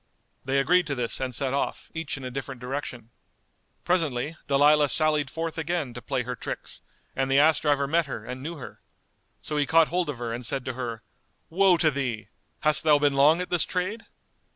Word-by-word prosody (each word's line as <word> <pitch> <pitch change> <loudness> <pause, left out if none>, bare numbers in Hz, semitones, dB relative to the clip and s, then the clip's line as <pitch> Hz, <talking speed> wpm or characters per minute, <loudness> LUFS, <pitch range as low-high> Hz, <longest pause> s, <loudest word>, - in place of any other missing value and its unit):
They 135 +1 0
agreed 175 +6 +3
to 140 - -2
this 120 -2 -2
and 130 -2 -3
set 135 0 0
off, 140 - -3
each 160 -4 -4
in 135 - -9
a 130 - -5
different 135 0 -6
direction. 125 -3 -6 0.7
Presently, 160 -5 0
Dalilah 145 +1 +4
sallied 150 -3 +3
forth 165 +2 -4
again 160 -5 -2
to 120 - -8
play 130 -1 -2
her 125 +1 -4
tricks - - -7 0.3
and 135 0 -1
the 135 - +3
ass 155 +2 +5
driver 145 -2 +1
met 165 +2 +1
her 115 -5 -6
and 125 +1 -6
knew 165 +5 -5
her. 140 - -10 0.6
So 150 - -4
he 145 -1 +1
caught 165 -1 +4
hold 175 -2 -1
of 145 - -4
her 120 -1 -4
and 120 +2 -5
said 130 +2 -1
to 130 - -3
her, 115 -3 -5 0.5
"Woe 185 +1 +4
to 160 -2 +3
thee! 120 -7 -3 0.3
Hast 155 0 +2
thou 150 -2 +5
been 145 -1 +2
long 150 +5 +4
at 180 - -6
this 175 -2 +3
trade?" 190 +5 -3
140 Hz, 205 wpm, -26 LUFS, 130-160 Hz, 0.7 s, ass